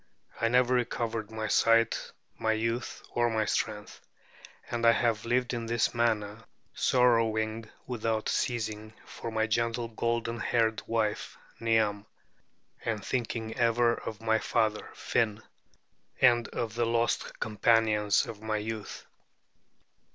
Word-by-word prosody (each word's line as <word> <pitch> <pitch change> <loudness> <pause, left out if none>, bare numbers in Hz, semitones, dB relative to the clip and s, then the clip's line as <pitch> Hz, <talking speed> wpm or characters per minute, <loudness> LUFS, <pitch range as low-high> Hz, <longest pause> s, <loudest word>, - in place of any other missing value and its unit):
I 115 - +3
never 125 +1 +3
recovered 115 -3 -1
my 110 -1 -4
sight, 115 +2 +3 0.2
my 110 0 0
youth, 115 +2 -2
or 120 0 +2
my 110 -1 0
strength; 105 0 -3 0.7
and 120 -1 -2
I 115 0 +7
have 115 -3 0
lived 125 +1 +1
in 115 -1 -3
this 115 -1 +1
manner, 110 -3 0 0.3
sorrowing 115 -3 +2 0.2
without 115 -3 -2
ceasing 110 -3 -2
for - - -7
my 110 -1 0
gentle 115 +1 -1
golden 115 +1 -2
haired 110 -1 +1
wife 110 -2 -1 0.2
Niam, 110 -2 +1 0.8
and 110 -3 -2
thinking 115 -2 -2
ever 115 0 +3
of 110 -2 -6
my 110 0 +2
father 110 -1 0
Finn, 110 -1 0 0.8
and 120 -2 +5
of 115 -2 -4
the 120 0 0
lost 115 0 0
companions 105 -1 +2
of 110 -2 -8
my 110 0 -1
youth. 110 0 -5
115 Hz, 125 wpm, -29 LUFS, 110-115 Hz, 0.8 s, I